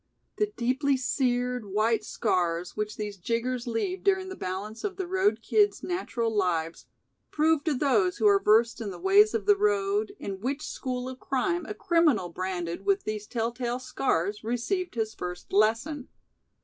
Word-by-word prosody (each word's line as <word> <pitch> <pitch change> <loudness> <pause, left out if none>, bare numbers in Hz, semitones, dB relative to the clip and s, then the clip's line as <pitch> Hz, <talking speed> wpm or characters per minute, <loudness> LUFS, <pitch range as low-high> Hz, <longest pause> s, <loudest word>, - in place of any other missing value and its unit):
The 420 0 0
deeply 265 +3 +1
seared, 250 -2 0
white 215 +2 +1
scars 180 -6 -1
which 210 0 -3
these 210 -1 -5
"jiggers" 235 +5 -2
leave 360 +12 -2
during 380 -1 +2
the 375 - -6
balance 200 - -5
of 390 -2 -3
the 380 - -2
road 380 +3 +1
kids' 415 -1 +2
natural 235 - -2
lives, 165 -4 -1 0.4
prove 310 -1 +2
to 310 -3 +1
those 360 +8 +2
who - - 0
are 400 -1 +5
versed 225 +2 +3
in 215 - -3
the 190 - -7
ways 405 +4 +5
of 450 - -1
the 410 0 +6
road, 405 0 +1
in 195 - -6
which 275 +5 -2
school 255 -1 -4
of 260 0 -7
crime 345 +4 -1
a 420 - -5
criminal 330 - +2
branded 175 -1 -4
with 395 0 +2
these 210 -1 -4
tell 230 -1 -1
tale 240 0 -2
scars 210 -6 -1
received 245 - -2
his 220 -1 -1
first 180 +1 -7
lesson. 230 +7 +1
250 Hz, 170 wpm, -27 LUFS, -, 0.4 s, the